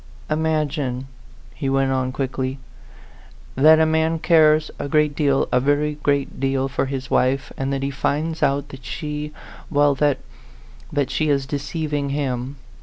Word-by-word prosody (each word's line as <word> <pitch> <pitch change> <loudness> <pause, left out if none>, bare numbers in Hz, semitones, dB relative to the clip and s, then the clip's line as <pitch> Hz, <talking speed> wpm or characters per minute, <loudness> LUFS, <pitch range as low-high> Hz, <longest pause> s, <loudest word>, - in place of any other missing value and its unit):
"Imagine," 150 -4 -1 0.5
he 135 -3 -3
went 135 0 +2
on 130 -1 0
quickly, 130 0 -3 1.0
"that 155 +3 +7
a 160 - +5
man 160 +1 +1
cares 155 -2 +4
a 140 - -3
great 150 0 +2
deal 140 -3 +2
a 125 - +4
very 145 +3 +1
great 140 -1 0
deal 135 0 0
for 135 0 -1
his 135 -1 -5
wife, 130 +2 +1
and 135 0 -2
that 135 0 -2
he 140 - -1
finds 155 +3 -1
out 140 0 +1
that 135 -2 -11
she 150 +3 -4 0.4
well, 145 -1 +3
that 145 0 +2 0.7
that 140 -3 0
she 155 -1 0
is 140 -2 +1
deceiving 145 +1 -3
him. 135 -2 -2
140 Hz, 155 wpm, -22 LUFS, 135-150 Hz, 1.0 s, that